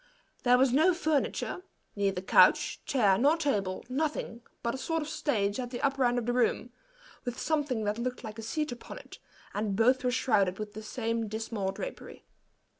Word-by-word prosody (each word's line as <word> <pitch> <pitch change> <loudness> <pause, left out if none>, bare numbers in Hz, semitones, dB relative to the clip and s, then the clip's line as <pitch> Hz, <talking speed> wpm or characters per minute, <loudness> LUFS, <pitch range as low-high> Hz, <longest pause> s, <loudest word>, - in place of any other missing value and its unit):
There 250 0 +5
was 255 -1 +3
no 330 +6 +4
furniture 315 +2 -1 0.3
neither 195 -2 0
couch, - - +4
chair, 205 -9 +3
nor 290 +6 +4
table 205 - -1
nothing 265 -3 -2 0.2
but 235 - 0
a - - -3
sort 325 +2 -1
of - - -7
stage 235 -9 -1
at 245 -1 -3
the 240 -1 -5
upper 275 -1 +1
end 245 0 +2
of 240 - -1
the 245 - 0
room, 245 0 +1 0.5
with 245 -2 -4
something 290 -8 0
that 210 +2 -1
looked 250 +1 -3
like 220 -1 -7
a - - -4
seat 300 +7 -2
upon 240 - -8
it, - - -12 0.3
and 205 -1 -1
both 255 +5 +3
were 250 - +2
shrouded 215 -7 +2
with 215 -1 -6
the 215 - -7
same 230 0 -2
dismal 215 -2 -3
drapery. - - -8
245 Hz, 190 wpm, -29 LUFS, 215-275 Hz, 0.5 s, There